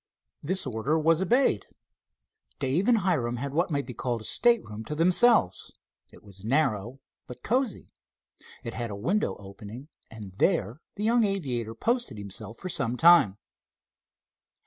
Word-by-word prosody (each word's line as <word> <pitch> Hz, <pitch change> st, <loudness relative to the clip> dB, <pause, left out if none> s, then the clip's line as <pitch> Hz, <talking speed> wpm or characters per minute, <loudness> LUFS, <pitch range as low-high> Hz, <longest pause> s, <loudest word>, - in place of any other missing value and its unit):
This 185 Hz, +6 st, -1 dB
order 130 Hz, +5 st, -1 dB
was 160 Hz, +2 st, +2 dB
obeyed. 230 Hz, -, +2 dB, 0.9 s
Dave 155 Hz, +10 st, 0 dB
and 240 Hz, -2 st, +5 dB
Hiram 140 Hz, -11 st, 0 dB
had 135 Hz, +3 st, -5 dB
what 170 Hz, +4 st, +1 dB
might 140 Hz, -4 st, -1 dB
be 125 Hz, -, -8 dB
called 120 Hz, -1 st, -3 dB
a -, -, -10 dB
stateroom 110 Hz, -, +1 dB
to 150 Hz, -, -5 dB
themselves. 180 Hz, -, +3 dB, 0.4 s
It -, -, -17 dB
was 100 Hz, -2 st, -13 dB
narrow, 125 Hz, -2 st, 0 dB, 0.3 s
but 125 Hz, -, -11 dB
cozy. 250 Hz, -1 st, -1 dB, 0.7 s
It 115 Hz, -, -6 dB
had 120 Hz, -1 st, -4 dB
a 100 Hz, -, -5 dB
window 180 Hz, -, -1 dB
opening, 105 Hz, +7 st, -11 dB, 0.2 s
and 105 Hz, -4 st, -10 dB
there 110 Hz, -, +1 dB
the 210 Hz, -, -5 dB
young 230 Hz, +2 st, +3 dB
aviator 130 Hz, -, -2 dB
posted 235 Hz, -, -1 dB
himself 105 Hz, +2 st, -8 dB
for -, -, -7 dB
some 135 Hz, -9 st, -1 dB
time. 165 Hz, -, +6 dB
135 Hz, 145 wpm, -27 LUFS, 110-185 Hz, 0.9 s, time